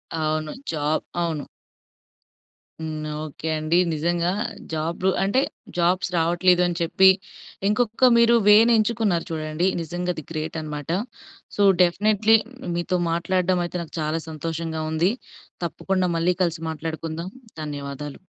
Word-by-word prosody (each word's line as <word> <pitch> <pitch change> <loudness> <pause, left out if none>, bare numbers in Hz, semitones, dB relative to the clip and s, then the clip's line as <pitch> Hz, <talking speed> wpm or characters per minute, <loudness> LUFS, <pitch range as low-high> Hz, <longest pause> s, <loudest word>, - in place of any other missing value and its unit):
అవును. 155 -1 -1 0.2
జా 155 -2 -3 0.4
అవును. 160 -4 -3 1.3
హ్మ్. 155 -1 -4 0.2
ఓకే 155 +1 -7
అండి. 155 +3 +1 0.2
నిజంగా, 170 +3 0 0.4
జాబ్ 165 +4 -2 0.2
అంటే 200 +7 +2 0.4
జాబ్స్ 180 +2 +2
రావట్లేదు 175 +2 +3
అని 175 - -1
చెప్పి, 190 +3 +5 0.6
ఇంకొక 230 +3 +3
మీరు 235 0 +5
వే 210 - +9 0.2
నేంచుకున్నారు 215 -5 +2
చూడండి, 155 +3 -1
నిజంగా 175 +2 -3
అది 155 - -7
గ్రేటన్నమాట. 155 -1 -5 0.7
సో, 205 - 0 0.2
డెఫినిట్‌లీ 210 +5 +4 0.4
మీతో 175 +2 0
మాట్లాడడమయితే 180 0 0
నాకు 160 - -14
చాలా 155 +1 -1
సంతోషంగా 160 0 -4
ఉంది. 170 +5 +2 0.5
తప్పకుండా 185 +2 -1
మళ్ళీ 175 +2 +2
కలిసి 165 -1 -1
మాట్లాడుకుందాం. 160 +2 -5 0.3
ధన్యవాదాలు. 145 -1 -6
170 Hz, 110 wpm, -24 LUFS, 155-185 Hz, 1.3 s, వే